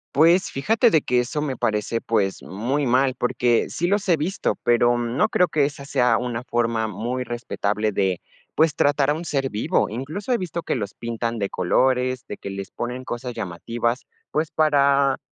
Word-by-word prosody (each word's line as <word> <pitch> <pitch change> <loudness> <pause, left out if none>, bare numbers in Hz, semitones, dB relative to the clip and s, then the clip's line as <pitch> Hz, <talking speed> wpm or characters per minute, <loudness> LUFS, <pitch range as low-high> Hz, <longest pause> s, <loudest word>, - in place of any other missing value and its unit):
Pues, 170 +5 +5
fíjate 225 - +2
de 160 -7 +3
que 125 0 +2
eso 125 +5 -2
me 145 -3 -2
parece, 110 +1 -1
pues, 100 -4 0
muy 130 +8 -2
mal, 130 +2 +3
porque 120 -1 +1
sí 175 - -2
los 200 +1 0
he 165 - +5
visto, 180 +7 -1
pero, 120 0 +3
mm, 120 0 -2
no 220 - +3
creo 180 -3 +3
que 150 -2 +2
esa 140 -1 -5
sea 125 -4 +2
una 120 -1 -3
forma 115 -2 0
muy 120 +5 -3
respetable 110 -3 -2
de, 95 -3 0 0.4
pues, 155 -1 +3
tratar 145 0 +2
a - - +2
un 160 +3 -5
ser 135 -4 -1
vivo, 105 - +1
incluso 155 - -5
he 240 - +2
visto 170 -2 -4
que - - -1
los 105 -5 -4
pintan 115 0 -3
de 100 -2 -1
colores, 130 +6 +1
de 105 - -6
que 100 - -7
les 95 0 -6
ponen 125 +2 -4
cosas 125 0 -5
llamativas, 115 +5 -3 0.2
pues, 155 +1 0
para 140 -3 +3
125 Hz, 190 wpm, -23 LUFS, 115-145 Hz, 0.4 s, Pues